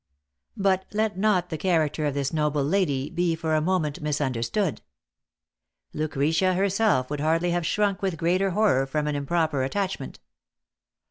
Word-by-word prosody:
But 190 -2 +1
let 215 0 0
not 190 -3 +1
the 160 - -3
character 155 -4 +1
of 145 - -2
this 140 0 -1
noble 150 -2 +1
lady 145 -4 0
be 175 -1 0
for 160 -1 -2
a 155 - +3
moment 160 -4 -1
misunderstood. 145 - -1 1.1
Lucretia 155 +5 +1
herself 195 - +1
would 150 - -2
hardly 165 +3 +1
have 175 -1 0
shrunk 200 0 0
with 190 -4 -1
greater 180 +4 +1
horror 190 -9 +2
from 150 +2 -1
an 150 -1 -1
improper 150 0 0
attachment. 185 +1 -3
165 Hz, 145 wpm, -25 LUFS, 145-190 Hz, 1.1 s, a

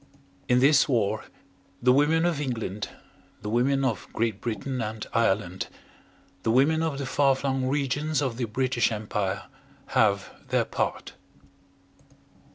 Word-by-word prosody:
In 125 - +5
this 140 +1 +5
war 110 -4 +1 0.5
the 125 +1 +4
women 155 +4 +3
of 165 -4 0
England 110 -6 -3 0.5
the 105 - -3
women 135 +4 +2
of 115 -7 -1
Great 110 -3 -1
Britain 120 +3 -3
and 110 0 -4
Ireland 95 -5 +1 0.7
the 110 - -1
women 140 +7 +4
of 160 -4 -1
the 140 - -3
far 135 +1 +3
flung 135 -1 -1
regions 145 +2 0
of 130 -5 -1
the 125 - -1
British 120 +1 +1
Empire, 105 -2 -2 0.5
have 100 -2 +2 0.2
their - - +2
part. - - -3
125 Hz, 135 wpm, -26 LUFS, 110-140 Hz, 0.7 s, In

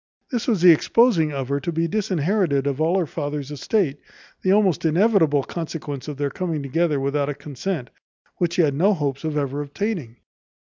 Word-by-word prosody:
This 240 -2 -2
was 215 -8 +1
the 180 - +10
exposing 165 -1 +3
of 135 -2 -4
her 140 0 0
to 170 - -3
be 165 +1 0
disinherited 185 -6 0
of 140 +1 -1
all 165 +4 +2
her 180 - +1
father's 145 -2 -4
estate, 145 - 0 0.4
the 185 - +2
almost 195 -5 +3
inevitable 165 -4 +3
consequence 155 -4 -6
of 150 -2 -5
their 140 -1 -1
coming 165 -4 -3
together 150 +1 0
without 140 +1 0
a 145 - -3
consent, 145 0 -5 0.5
which 175 -1 0
he 175 - +4
had 145 -3 +2
no 190 +8 +3
hopes 140 -3 -3
of 155 -1 -2
ever 140 0 -1
obtaining. 145 - -4
155 Hz, 185 wpm, -22 LUFS, 140-185 Hz, 0.5 s, the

